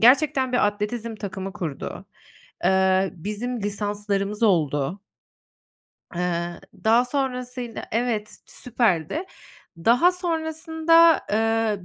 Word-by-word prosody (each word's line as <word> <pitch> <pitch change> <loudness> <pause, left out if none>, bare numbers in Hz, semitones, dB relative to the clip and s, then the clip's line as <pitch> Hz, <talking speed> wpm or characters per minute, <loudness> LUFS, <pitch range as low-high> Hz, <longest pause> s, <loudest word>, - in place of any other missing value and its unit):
Gerçekten 260 +1 +4
bir 245 - +4
atletizm 215 +2 -3
takımı 195 -2 -5
kurdu. 165 -8 -5 0.6
Eee, 190 0 +3
bizim 215 +7 -4
lisanslarımız 205 0 -2
oldu. 160 -3 +1 1.1
Eee, 175 -1 -2 0.2
daha 230 +3 +5
sonrasında 250 -3 -3
Evet, 225 -2 -1
süperdi. 235 - -1 0.5
Daha 245 - +4
sonrasında, 325 -1 +3
eee, 225 -3 +1
220 Hz, 85 wpm, -24 LUFS, 195-250 Hz, 1.1 s, daha